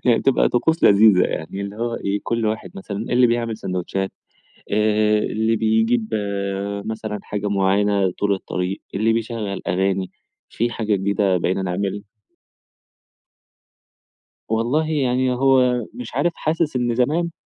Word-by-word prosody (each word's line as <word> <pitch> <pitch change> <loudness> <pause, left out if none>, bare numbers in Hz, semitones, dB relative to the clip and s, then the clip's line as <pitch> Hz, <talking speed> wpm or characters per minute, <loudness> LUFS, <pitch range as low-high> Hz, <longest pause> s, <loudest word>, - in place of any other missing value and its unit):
هي 120 -2 +3
تبقى 135 - +3
طقوس 160 +7 +1
لذيذة 100 -2 +6
يعني 80 +5 -4
اللي 100 +1 -5
هو 120 +1 -2
إيه، 100 -1 -2
كل 115 -1 -1
واحد 110 0 -3
مثلًا 100 +1 -6
اللي 120 +4 +2
بيعمل 115 -1 -1
ساندوتشات، 95 -1 -3 0.6
آآ، 105 0 +3
اللي 110 +1 0
بيجيب 110 +1 +1 0.8
مثلًا 110 -1 -4
حاجة 105 0 -3
معيّنة 100 0 +2
طول 100 +2 0
الطريق، 95 0 -3
اللي 110 +3 +2
بيشغّل 115 -3 -3
أغاني. 95 +1 0 0.4
في 120 +2 -1
حاجة 110 -3 0
جديدة 95 -1 +1
بقينا 90 +2 0
نعمل 95 +2 -2 2.5
والله 120 +8 +1
يعني 130 -4 +1
هو 125 -2 +3
مش 250 0 -8
عارف، 175 - +1
حاسس 155 -2 -1
إن 120 -1 0
زمان 155 +8 +1
110 Hz, 130 wpm, -21 LUFS, 100-120 Hz, 2.5 s, لذيذة